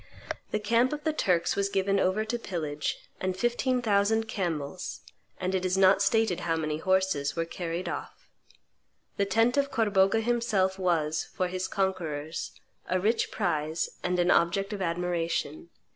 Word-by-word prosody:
The - - 0
camp 230 +5 +2
of 300 0 -5
the 315 - +1
Turks 180 - +1
was 200 0 0
given 195 0 +1
over 190 +4 +1
to 235 +2 -2
pillage; 155 -8 -3 0.2
and 185 0 -2
fifteen 245 +3 +1
thousand 220 +1 +2
camels, 175 -5 -3 0.4
and 185 0 -1
it 185 -1 0
is 185 0 +1
not 195 0 +5
stated 205 -2 +2
how 165 -1 0
many 155 -1 -2
horses, 185 -6 +1
were 165 0 0
carried 170 +1 -4
off. - - -7 0.9
The 200 - +2
tent 225 +6 +3
of 280 0 +2
Corbogha 205 -3 +3
himself 215 -5 +1
was, 160 -4 +1
for 185 -3 0
his 185 +1 -2
conquerors, 165 -6 -2 0.4
a 185 - +2
rich 220 +5 +1
prize 155 -5 -1
and 180 0 0
an 175 0 +3
object 195 +5 +2
of 200 - -4
admiration. 175 - -2
190 Hz, 160 wpm, -28 LUFS, 170-215 Hz, 0.9 s, not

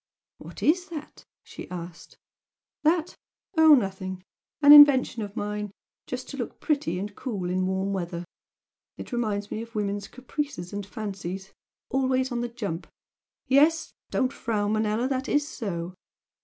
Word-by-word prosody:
"What - - -10
is 360 +4 +3
that?" 305 -3 -9 0.2
she - - -10
asked. 175 -1 -8 0.7
"That? 325 +2 +2 0.4
Oh, 320 -2 +8
nothing! 190 -5 -3 0.4
An 290 -1 +8
invention 285 -5 +8
of 205 -1 -6
mine 210 0 -3 0.4
just 250 0 -5
to 280 - -7
look 240 - -5
pretty 280 - 0
and 200 +2 -5
cool 195 -9 -3
in 185 0 +1
warm 190 +1 -1
weather! 175 -2 -4 0.7
It - - -8
reminds 210 -4 -2
me 215 - -3
of 230 0 -10
women's 205 -1 -2
caprices 255 -8 -5
and 200 -1 -4
fancies 195 -3 -6 0.4
always 260 0 +1
on 240 -1 -1
the 240 - -2
jump! 205 -8 -5 0.6
Yes! 305 +4 +3 0.2
don't 260 -1 0
frown, 210 -2 -1
Manella! 220 +3 +1
that 265 0 -2
is 290 0 +2
so! 180 - -4
220 Hz, 145 wpm, -26 LUFS, 195-270 Hz, 0.7 s, Oh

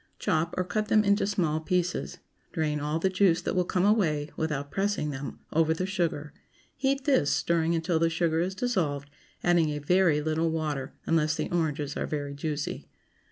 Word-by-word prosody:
Chop, 160 +2 0
or 185 - +2
cut 210 +4 -2
them 215 -1 +4
into 200 0 +2
small 170 -7 0
pieces; 180 +2 -1 0.4
drain 155 -3 0
all 150 +2 -1
the 165 - +1
juice 185 -2 +3
that - - -2
will 180 - +3
come 180 +1 0
away, 160 -9 +2
without 145 -3 -2
pressing 195 -6 0
them, 140 0 -6
over 160 0 +3
the 185 - -2
sugar; 165 -6 -2 0.4
heat 275 0 0
this, 265 - +3
stirring 170 0 +1
until 165 0 0
the 165 0 +3
sugar 165 -1 +1
is 185 +3 -1
dissolved, 160 - -1 0.3
adding 175 -3 +3
a 150 - -2
very 165 +1 +3
little 155 +2 0
water, 150 -4 -3
unless 155 -1 +2
the - - -3
oranges 150 -4 -1
are - - -2
very 145 -2 -3
juicy. 145 +1 -4
165 Hz, 180 wpm, -28 LUFS, 150-185 Hz, 0.4 s, them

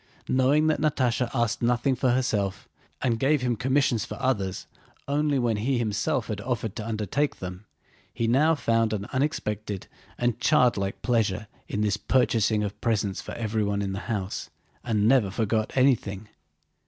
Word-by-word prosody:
Knowing 135 +4 +3
that 155 -1 +1
Natásha 130 -5 +1
asked 120 -5 0
nothing 120 +3 +2
for 125 +1 +1
herself, 105 -6 0 0.4
and 115 -3 +1
gave 140 +1 +2
him 125 -1 +1
commissions 130 -2 +1
for - - -7
others 100 -8 -1 0.4
only 145 0 +1
when 120 -4 +1
he 125 +5 0
himself 115 +4 0
had 105 -2 -4
offered 115 -3 -3
to 110 - -4
undertake 115 +6 -1
them, 90 +3 -8 0.4
he 115 - -2
now 150 +7 +4
found 115 -5 +1
an 100 -2 -3
unexpected 105 -8 -2 0.3
and 120 -1 0
childlike 120 -10 +2
pleasure 110 -4 +1 0.2
in 105 - -2
this 105 -1 +1
purchase 115 -4 +2
of 105 -1 -2
presents 105 -4 0
for - - -8
everyone 105 -3 -1
in 95 - -2
the 95 - -3
house, 100 -4 -3 0.3
and 110 -3 +1
never 120 -5 +4
forgot 110 +2 0
anything. 110 -6 +2
115 Hz, 155 wpm, -26 LUFS, 105-130 Hz, 0.4 s, now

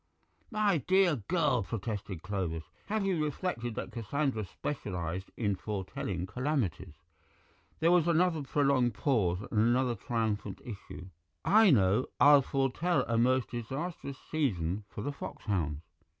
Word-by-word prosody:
"My 210 -6 +2
dear 185 +1 +3
girl," 145 - +1
protested 100 -4 -4
Clovis, 90 -5 -2 0.2
"have 210 -1 0
you 180 -5 +1
reflected 135 - -3
that - - -5
Cassandra 125 0 -1
specialized 90 - -4
in 100 -4 0
foretelling 95 -2 -4
calamities?" 95 - -2 0.9
There 165 +2 +5
was 175 -2 +4
another 170 -1 +3
prolonged 135 -3 +2
pause 100 - +1
and 105 - +1
another 120 +2 +3
triumphant 110 -5 -2
issue. 100 -4 -8 0.4
"I 215 0 +6
know. 105 - +4
I'll 145 -1 +8
foretell 135 +7 +1
a 115 -1 0
most 130 +1 +2
disastrous 135 +4 -5
season 100 - 0
for 105 - -6
the 145 - -2
foxhounds." 85 - -3
120 Hz, 125 wpm, -31 LUFS, 100-150 Hz, 0.9 s, I'll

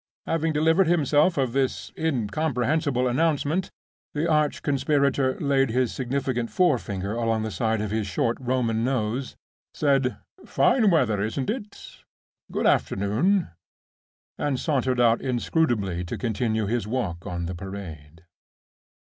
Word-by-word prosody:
Having 165 -1 0
delivered 160 +4 +3
himself 155 0 +3
of 130 -4 0
this 135 -1 -1
incomprehensible 140 -1 0
announcement, 155 +5 0 0.5
the 155 +3 0
arch 150 -2 +1
conspirator 140 -1 +1
laid 135 -2 +2
his 125 +1 0
significant 130 -2 -2
forefinger 105 - 0
along 115 -1 0
the 110 - -3
side 110 +3 0
of 105 -1 -3
his 110 -1 -1
short 115 +5 0
Roman 120 -3 0
nose, 125 0 -1 0.4
said, 135 -3 +1 0.3
"Fine 225 -6 +3
weather, 125 - +2
isn't 120 - -1
it? 210 -4 -9 0.5
Good - - -1
afternoon!" 130 - +2 0.9
and 140 -3 0
sauntered 130 -5 0
out 115 -1 +4
inscrutably 120 - 0
to 85 - -5
continue 110 -2 -1
his 115 0 -1
walk 105 -9 -3
on 85 -1 -3
the 90 - -4
Parade. 85 -4 -9
125 Hz, 125 wpm, -25 LUFS, 110-150 Hz, 0.9 s, out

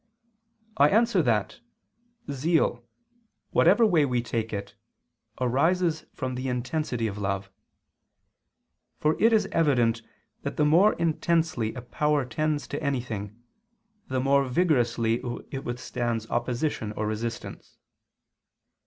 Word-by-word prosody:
I 145 +1 +6
answer 225 -1 +3
that, 115 -7 0 0.7
Zeal, 140 -3 +1 0.7
whatever 235 - +5
way 175 -8 +4
we 125 -4 0
take 115 -2 -3
it, 100 -1 -5 0.7
arises 160 +7 +1
from 130 -3 -3
the 130 +1 -4
intensity 125 -1 -2
of 105 -1 -3
love. 100 0 -3 1.5
For 155 +1 +2
it 225 - +6
is 215 -3 +3
evident 120 -8 +2 0.4
that - - -5
the 150 - +3
more 175 +8 +5
intensely 160 -7 0
a 125 - -7
power 150 +2 0
tends 150 +2 -1
to - - -4
anything, 120 -5 -4 0.6
the 130 0 -1
more 140 +1 +3
vigorously 120 -6 +1 0.3
it 135 -1 -5
withstands 120 -2 -3
opposition 120 -2 -1
or 110 - -3
resistance. 110 +2 -5
130 Hz, 115 wpm, -26 LUFS, 115-155 Hz, 1.5 s, I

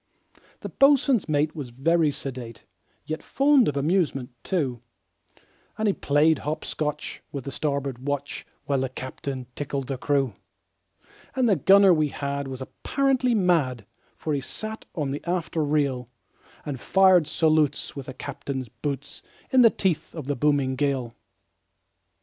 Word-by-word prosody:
The - - -5
boatswain's 275 - +4
mate 150 +1 +1
was 140 -5 -5
very 155 +6 +2
sedate, 130 -5 -7 0.4
Yet 155 +1 -4
fond 275 -2 +4
of 140 - -1
amusement, 145 -4 0
too; 135 - -1 1.0
And 220 0 0
he 200 - +3
played 150 0 +3
hop 155 +2 -3
scotch 150 -1 -3
with 140 -3 -5
the 140 - -5
starboard 140 -3 -2
watch, 140 +1 -3 0.2
While 140 -2 +1
the 130 0 -1
captain 130 0 -6
tickled 140 -1 -3
the 135 -1 -4
crew. 135 -5 +1 1.0
And 260 -2 +2
the 205 - +4
gunner 195 +4 +6
we 155 -2 +2
had 140 0 -3
was 130 -1 -7
apparently 260 - 0
mad, 155 - +1 0.3
For 155 - -2
he 140 - 0
sat 215 - -6
on 145 -5 -1
the 145 - -4
after 170 -2 -1
rail, 140 -5 0 0.6
And 140 -4 -4
fired 185 -2 +5
salutes 155 -3 +1
with 140 -2 -7
the 130 - -7
captain's 135 -3 -5
boots, 140 +4 -5 0.3
In 260 - +6
the 230 - +8
teeth 175 -7 -1
of 155 -5 -6
the 145 +1 -1
booming 140 -1 +1
gale. 130 -4 -1
145 Hz, 150 wpm, -25 LUFS, 135-170 Hz, 1.0 s, the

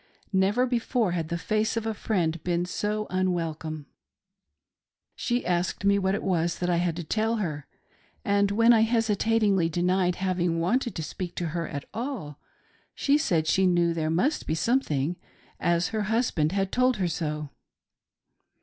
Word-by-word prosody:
Never 200 +6 +3
before 240 -4 0
had 165 -2 -2
the 170 - -1
face 215 +5 0
of 225 - -2
a 225 - -1
friend 170 -7 -1
been 175 0 0
so 210 +3 -2
unwelcome. 160 -5 -2 1.3
She 240 +1 -1
asked 180 +2 -1
me 200 0 +4
what 190 0 +1
it - - -4
was 170 -3 0
that 180 0 -1
I 170 - +2
had 175 -1 0
to 170 - -4
tell 220 +7 0
her; 155 -9 -3 0.6
and 200 0 +3
when' 230 +4 +5
I 225 - +5
hesitatingly 220 -4 +2
denied 180 +1 +1
having 180 -3 0
wanted 235 +8 0
to 160 - -3
speak 175 +3 -6
to 170 -2 -2
her 165 +1 -3
at 140 -2 -6
all, 225 - -5 0.6
she 280 - +2
said 170 - +1
she 190 +4 +3
knew 175 -1 +2
there 160 -1 -1
must 245 - 0
be 160 - 0
something, 170 - 0 0.4
as 170 +1 +1
her 220 -1 -2
husband 210 -8 +1
had 195 0 -1
told 255 -1 +2
her 185 -2 0
so. 150 -3 -3
185 Hz, 165 wpm, -27 LUFS, 170-220 Hz, 1.3 s, when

